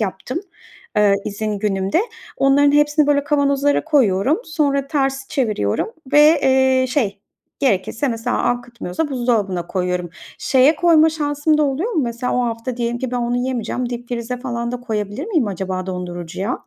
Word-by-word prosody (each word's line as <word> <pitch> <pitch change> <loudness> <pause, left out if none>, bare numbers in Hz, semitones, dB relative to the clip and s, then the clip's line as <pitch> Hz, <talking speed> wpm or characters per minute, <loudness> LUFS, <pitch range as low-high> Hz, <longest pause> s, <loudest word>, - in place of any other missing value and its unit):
yaptım, 215 - -3 0.6
eee, 205 -1 +5
izin 210 0 -3
günümde. 195 - 0 0.4
Onların 285 +1 +4
hepsini, 295 0 +3
böyle, 285 -1 +2
kavanozlara 285 -1 +1
koyuyorum, 270 - +2
sonra 285 - 0
ters 270 -2 -1
çeviriyorum 215 - -1 0.2
ve, 300 +2 +6
eee, 260 -1 +3
şey, 215 -7 -1 0.4
gerekirse, 230 +1 0
mesela, 235 +1 -1
akıtmıyorsa 240 - -2
buzdolabına 215 -9 0
koyuyorum. 180 -2 -2 0.3
Şeye 270 +3 +4
koyma 325 -2 +5
şansım 300 0 0
da 305 - +3
oluyor 300 - -1
mu? 315 - +1
Mesela, 240 +1 -2
o 250 - +1
hafta 230 +1 -4
diyelim 240 0 -2
ki 255 -1 -3
ben 250 - -2
onu 240 0 -1
yemeyeceğim. 250 -1 -2
Dipfrize 240 0 -4
falan 235 -2 -3
da 245 - -4
koyabilir 215 - -4
miyim 330 - +1
acaba 190 -1 -4
dondurucuya? 180 +4 -5
250 Hz, 150 wpm, -20 LUFS, 210-285 Hz, 0.6 s, ve